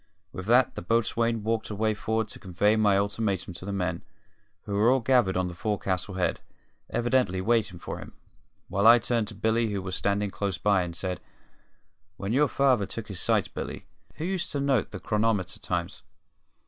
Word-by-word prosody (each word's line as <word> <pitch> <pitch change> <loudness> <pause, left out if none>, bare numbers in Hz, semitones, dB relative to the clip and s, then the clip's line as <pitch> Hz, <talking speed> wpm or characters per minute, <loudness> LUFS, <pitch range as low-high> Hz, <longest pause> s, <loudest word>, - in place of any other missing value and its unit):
With 95 +1 -7
that 125 +2 +4
the - - -6
boatswain 115 +2 +1
walked 110 0 -1
away 110 +1 0
forward 110 +1 -1
to - - -10
convey 100 +3 +1
my 105 -3 +4
ultimatum 100 -2 -1
to 85 - -9
the 100 - -3
men, 90 -3 -2 0.6
who 100 - -5
were 105 +4 +4
all 130 +1 +4
gathered 120 -7 +3
on 95 0 +1
the 90 - -6
forecastle 95 -1 -2
head, 90 -1 0 0.5
evidently 120 -6 +1
waiting 110 -2 +1
for - - -6
him, - - -10 0.5
while 100 +3 +2
I 120 +1 +10
turned 115 -2 0
to 110 - -9
Billy, 110 +2 +1
who 100 -1 -2
was 95 -1 -3
standing 100 0 0
close 100 -3 -2
by, 100 -1 +3
and 85 -1 -4
said: 90 0 -2 1.0
"When 100 +3 -3
your 145 +3 +4
father 130 -9 +2
took 115 -2 -6
his 95 -4 -4
sights, - - +2
Billy, - - -6 0.3
who 160 - -4
used 190 0 -2
to 145 - -1
note 140 -4 +1
the - - -7
chronometer 105 -3 0
times?" - - -3
105 Hz, 185 wpm, -27 LUFS, 95-115 Hz, 1.0 s, I